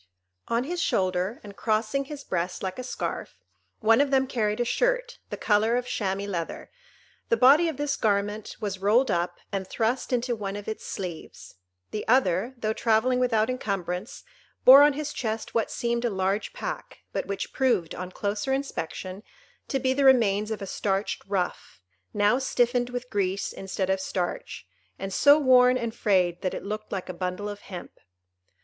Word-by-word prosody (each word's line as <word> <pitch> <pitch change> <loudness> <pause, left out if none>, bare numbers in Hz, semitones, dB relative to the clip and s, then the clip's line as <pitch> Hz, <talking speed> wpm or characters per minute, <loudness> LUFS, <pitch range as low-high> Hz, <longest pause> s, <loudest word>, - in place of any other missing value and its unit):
On 235 +1 +1
his 345 +5 -3
shoulder, 185 - 0
and 205 -1 -10
crossing 220 +6 0
his 290 0 -8
breast 180 -2 -3
like 190 +4 -3
a - - -4
scarf, 250 - -4 0.5
one 225 +3 +5
of 285 - +2
them 265 -1 +3
carried 215 -5 -1
a 240 - +1
shirt, - - 0
the - - -5
colour 220 +2 +2
of 250 - -2
chamois 200 -5 -2
leather; 175 -5 -5 0.6
the 465 - +3
body 290 +7 +6
of 310 - -5
this 290 -1 -1
garment 205 -1 -1
was 200 -3 -3
rolled 220 +7 +3
up 175 +1 -1
and 195 -1 -3
thrust 235 +6 -1
into 245 0 0
one 200 -2 -4
of 205 0 -7
its 220 - -5
sleeves: 180 -4 -7 0.4
the 210 - -3
other, 235 0 +2
though 220 -2 -1
travelling 235 +3 +2
without 225 -3 +2
incumbrance, 200 -6 -3 0.4
bore 270 +2 +11
on 290 0 +6
his 295 +1 -4
chest 220 -2 -3
what 230 -2 +1
seemed 235 -1 -1
a 240 - +2
large 195 +1 -1
pack, - - -6
but - - -2
which 195 -1 -4
proved, 225 -11 +1
on 180 0 -5
closer 205 +6 -2
inspection, 195 -8 -3 0.5
to 270 - 0
be 260 0 +1
the 280 +1 +1
remains 215 -6 +4
of 215 -2 -4
a - - -3
starched 195 +1 -2
ruff, 180 - -3 0.3
now 210 +5 +3
stiffened 245 -2 +1
with 250 0 -6
grease 195 -1 -1
instead 190 0 -2
of 190 - +1
starch, 175 - -4 0.3
and 195 0 -5
so 285 +7 +6
worn 255 -3 +5
and 235 -2 -3
frayed 185 -6 +1
that 185 -2 -2
it - - -6
looked 215 +1 -5
like 190 -2 -3
a 185 - -5
bundle 180 +3 -3
of 205 0 -6
hemp. 185 -4 -10
215 Hz, 180 wpm, -26 LUFS, 195-255 Hz, 0.6 s, bore